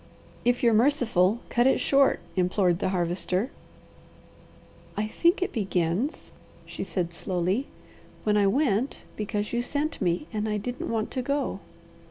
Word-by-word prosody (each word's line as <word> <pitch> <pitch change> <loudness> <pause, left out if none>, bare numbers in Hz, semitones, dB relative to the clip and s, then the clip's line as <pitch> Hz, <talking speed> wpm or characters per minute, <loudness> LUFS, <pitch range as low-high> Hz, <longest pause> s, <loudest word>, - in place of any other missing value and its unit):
"If 245 +1 +1
you're 235 -1 +5
merciful, 225 -5 +3
cut 240 +1 +3
it 265 - +3
short!" 275 -1 +3
implored 180 -1 +2
the - - 0
Harvester. 180 +5 0 1.5
"I 210 - +1
think 340 +11 +2
it - - -3
begins," 195 - -1 0.3
she - - -5
said 175 -3 -2
slowly, 185 +8 -1 0.6
"when 210 -1 +2
I 205 -1 +4
went 255 +1 +1
because 210 0 -3
you 240 - +1
sent 295 +5 -2
me 175 - 0
and 215 0 -1
I 210 - 0
didn't 245 +5 -4
want 225 -1 -1
to 255 - -1
go. 280 -5 -1
215 Hz, 145 wpm, -27 LUFS, 185-255 Hz, 1.5 s, you're